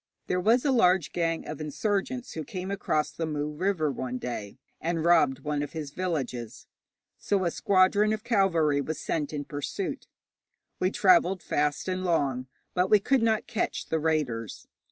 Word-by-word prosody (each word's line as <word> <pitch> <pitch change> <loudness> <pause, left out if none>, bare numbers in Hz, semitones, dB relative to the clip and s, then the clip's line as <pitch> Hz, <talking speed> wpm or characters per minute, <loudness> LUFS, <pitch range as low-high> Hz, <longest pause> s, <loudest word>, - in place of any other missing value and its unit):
There 180 - 0
was 230 +8 +3
a 280 - +3
large 185 - +3
gang 165 -1 -1
of 150 0 -6
insurgents 205 - -2
who 160 - -5
came 185 +5 -5
across 155 -6 0
the 160 +1 -3
Mu 150 -1 -2
River 160 -1 0
one 125 -1 -4
day, 115 -5 -5 0.2
and 165 0 -1
robbed 160 -6 +4
one 150 -1 -1
of 145 - -5
his 155 -3 -5
villages, 140 -10 -4 0.5
so 195 -3 0
a 170 - +1
squadron 200 +4 +3
of 215 0 -2
cavalry 170 -11 +2
was 155 +3 -4
sent 150 -3 -2
in 145 -2 -4
pursuit. 155 - -4 0.7
We 185 - +2
travelled 185 -1 +4
fast 145 +3 0
and 185 0 -2
long, 140 -7 0 0.3
but 180 +1 +1
we 210 - +7
could 265 +5 +2
not 220 -1 +2
catch 230 - -3
the 160 - +1
raiders. 145 -9 -2
165 Hz, 170 wpm, -28 LUFS, 145-190 Hz, 0.7 s, we